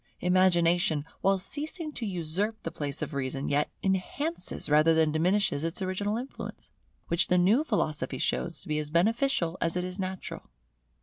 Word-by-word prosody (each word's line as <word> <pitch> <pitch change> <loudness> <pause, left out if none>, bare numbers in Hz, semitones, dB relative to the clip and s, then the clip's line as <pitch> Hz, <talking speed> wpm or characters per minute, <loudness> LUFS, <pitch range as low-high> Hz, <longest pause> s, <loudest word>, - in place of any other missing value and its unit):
Imagination, 175 -3 +3
while 195 0 +3
ceasing 305 - -3
to 240 -6 -4
usurp 190 +5 -2
the - - -3
place 145 0 -3
of 150 +1 -5
Reason, 135 0 -2
yet 145 +1 +1
enhances 200 - -2
rather 155 +2 +5
than 160 -1 +3
diminishes 175 0 +1
its 165 0 -1
original 200 +3 -1
influence, 255 +3 -7 0.4
which 170 0 +4
the 180 - +3
new 205 +11 +4
philosophy 180 - -1
shows 65 0 -1
to - - -13
be 150 0 0
as 150 -1 -4
beneficial 185 - +1
as 165 0 +1
it 180 - -1
is 180 +2 -5
natural. 190 -1 -5
180 Hz, 165 wpm, -28 LUFS, 155-205 Hz, 0.4 s, rather